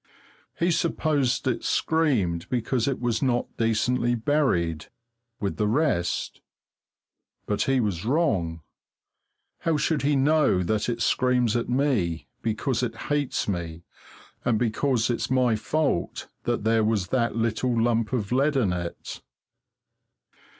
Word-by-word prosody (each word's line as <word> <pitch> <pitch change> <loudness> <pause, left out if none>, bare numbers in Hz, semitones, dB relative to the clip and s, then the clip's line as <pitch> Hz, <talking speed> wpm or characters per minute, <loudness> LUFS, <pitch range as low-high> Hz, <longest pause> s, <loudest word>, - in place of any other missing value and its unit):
He 170 +1 +2
supposed 145 -6 0
it 125 - -1
screamed 115 - +1
because 125 -1 0
it 135 - -1
was 120 -2 -1
not 125 -3 0
decently 120 +2 +1
buried 110 - 0 0.5
with 100 -2 -3
the 105 - +1
rest. 110 - 0 1.0
But 105 - -1
he 135 -1 +2
was 100 -7 -1
wrong. 105 - 0 1.0
How 165 -2 0
should 150 0 0
he 145 +1 +2
know 140 -9 +3
that 105 +5 0
it 120 - -1
screams 125 -3 +2
at 120 - -1
me 120 - 0 0.2
because 115 +3 -1
it 125 - -2 0.2
hates 145 -2 -1
me, 85 -4 -4 0.6
and 120 -3 +2
because 120 +1 +1
it's 120 - -2
my 125 -3 +3
fault 140 - -1 0.2
that - - -1
there 110 0 +3
was 105 -4 0
that 120 -3 0
little 115 +1 0
lump 115 -1 +1
of 115 -5 -2
lead 140 +4 +2
in 110 -9 +2
it? 85 -1 -6
120 Hz, 130 wpm, -25 LUFS, 105-135 Hz, 1.0 s, know